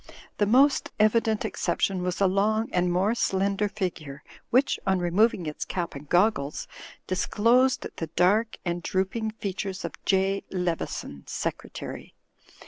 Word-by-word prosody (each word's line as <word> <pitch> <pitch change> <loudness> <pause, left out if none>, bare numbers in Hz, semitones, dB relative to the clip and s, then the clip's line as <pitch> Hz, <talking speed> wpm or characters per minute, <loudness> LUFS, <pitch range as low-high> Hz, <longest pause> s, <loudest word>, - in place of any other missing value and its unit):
The 205 - +3
most 270 +6 +4
evi 215 +2 +5
dent 220 -2 -1
exception 185 +2 -1
was 180 0 -2
a 200 - +4
long 210 +4 +1
and 180 0 +2
more 190 +5 +2
slender 200 -2 0
figure, 160 -8 -5 0.3
which, 255 +4 +3
on 190 0 +3
removing 180 +2 +2
its 150 -1 -4
cap 175 -2 -3
and 140 +1 -10
goggles, 175 -6 +1 0.4
disclosed 235 +7 +2
the 165 - -3
dark 205 +6 +3
and 175 0 -2
drooping 190 +6 -1
features 195 -2 -4
of - - -5
J. 195 0 +1
Leveson, 170 - -3
Secretary. - - -5
195 Hz, 135 wpm, -26 LUFS, 180-215 Hz, 0.4 s, evi